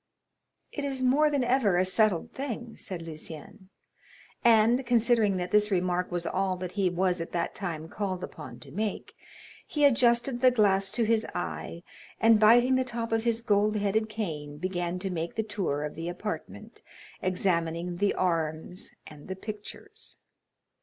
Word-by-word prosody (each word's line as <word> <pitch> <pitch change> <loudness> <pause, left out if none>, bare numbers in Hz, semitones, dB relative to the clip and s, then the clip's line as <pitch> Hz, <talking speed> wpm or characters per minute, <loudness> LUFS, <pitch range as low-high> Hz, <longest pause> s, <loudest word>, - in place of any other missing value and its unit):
"It 290 - -5
is 270 -2 -2
more 285 +4 +4
than 285 -3 +1
ever 240 -7 +2
a 185 - +3
settled 215 +2 +2
thing," 240 -4 -5
said 180 -3 -5
Lucien,—and, 205 - -1
considering 230 -4 +3
that 180 0 -3
this 210 0 +4
remark 180 -2 0
was 175 -1 -1
all 190 -1 0
that 180 -1 -5
he 195 -2 +1
was 180 0 0
at 165 - -6
that 170 -1 -1
time 165 -5 -4
called 185 0 -3
upon - - -8
to - - -13
make, 210 +2 -3 0.5
he 295 -1 +2
adjusted 240 -1 +3
the 255 - +7
glass 195 -5 +3
to 235 - 0
his 225 0 +2
eye, 170 -1 -4 0.4
and 225 -1 +5
biting 240 +4 +6
the 260 - +2
top 235 -2 -4
of 225 0 0
his 230 -1 +1
gold 210 -1 +2
headed 210 +2 0
cane, 155 -9 -5
began 175 +1 -2
to 190 +1 -3
make 170 -1 -3
the 220 - 0
tour 185 -9 -2
of 150 - -4
the 165 +2 -5
apartment, 205 +4 -6 0.4
examining 175 -2 -1
the 200 +2 +1
arms 165 0 -1 0.2
and 150 -1 -12
the 190 - -4
pictures. 215 - -8
200 Hz, 160 wpm, -28 LUFS, 175-230 Hz, 0.5 s, the